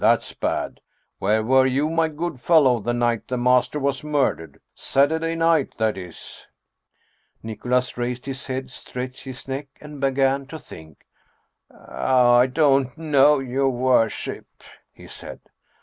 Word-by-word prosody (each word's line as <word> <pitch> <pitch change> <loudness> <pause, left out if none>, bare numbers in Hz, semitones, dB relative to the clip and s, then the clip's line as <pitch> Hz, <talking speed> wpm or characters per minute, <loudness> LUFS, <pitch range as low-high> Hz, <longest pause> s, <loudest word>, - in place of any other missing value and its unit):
That's - - +2
bad! - - -3 0.4
Where 110 +2 +1
were 130 +3 +4
you, 135 +4 +1
my 165 0 +1
good 160 -2 -5
fellow, 140 -7 +4
the 120 +3 -2
night 120 -1 0
the 125 - -2
master 125 +3 +2
was 140 0 -1
murdered? 145 - -1 0.2
Satur 145 +4 +1
day 165 0 -2
night, 165 -3 +1
that 110 -1 +1
is." 90 -3 -10 1.0
Nicholas 125 +3 -1
raised 125 +1 -3
his 135 -1 -6
head, 130 -1 -4
stretched 125 +1 -7
his 130 0 -9
neck, 135 +2 -4
and 150 -2 -11
began 135 0 +1
to 160 - -8
think. 80 - -14 0.5
" - - -57
I 125 -1 +2
don't 135 -1 +2
know, 150 -2 +4
your 135 0 0
worship," 125 -3 0 0.4
he - - -16
said. - - -10
130 Hz, 145 wpm, -23 LUFS, 125-145 Hz, 1.0 s, were